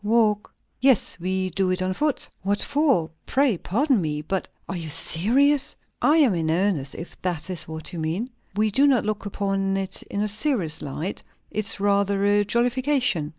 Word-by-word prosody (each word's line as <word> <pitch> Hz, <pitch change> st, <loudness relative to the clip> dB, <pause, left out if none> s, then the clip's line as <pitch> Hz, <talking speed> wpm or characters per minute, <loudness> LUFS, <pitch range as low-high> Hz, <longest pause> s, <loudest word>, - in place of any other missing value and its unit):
"Walk!" 215 Hz, -1 st, +2 dB, 0.3 s
"Yes. 255 Hz, -8 st, +2 dB
We 185 Hz, +1 st, -1 dB
do 190 Hz, +2 st, 0 dB
it 185 Hz, 0 st, 0 dB
on 185 Hz, 0 st, 0 dB
foot." 295 Hz, +6 st, -1 dB
"What 200 Hz, +2 st, 0 dB
for? 275 Hz, -, +1 dB, 0.2 s
Pray, 270 Hz, -5 st, +2 dB
pardon 250 Hz, -, +1 dB
me! 150 Hz, -2 st, -2 dB
But 190 Hz, +4 st, -2 dB, 0.2 s
are 195 Hz, -, -4 dB
you 165 Hz, -3 st, -4 dB
serious?" 260 Hz, -, +3 dB, 0.3 s
"I 305 Hz, +2 st, +4 dB
am 275 Hz, -10 st, +5 dB
in 165 Hz, -2 st, -1 dB
earnest, 165 Hz, -5 st, 0 dB
if 170 Hz, -, -9 dB
that 180 Hz, 0 st, -3 dB
is 165 Hz, -4 st, -2 dB
what 160 Hz, +2 st, -6 dB
you 170 Hz, -, -4 dB
mean. 175 Hz, +11 st, -2 dB, 0.2 s
We 215 Hz, +1 st, +2 dB
do 275 Hz, +7 st, +4 dB
not 255 Hz, -6 st, +3 dB
look 210 Hz, -1 st, -2 dB
upon 195 Hz, -1 st, -1 dB
it 195 Hz, 0 st, -3 dB
in 200 Hz, -, -2 dB
a -, -, 0 dB
serious 210 Hz, -, +1 dB
light. 155 Hz, +6 st, -4 dB, 0.3 s
It's 210 Hz, -1 st, -1 dB
rather 200 Hz, 0 st, +2 dB
a 205 Hz, 0 st, +4 dB
jollification." 240 Hz, -, +1 dB
200 Hz, 180 wpm, -24 LUFS, 180-240 Hz, 0.3 s, am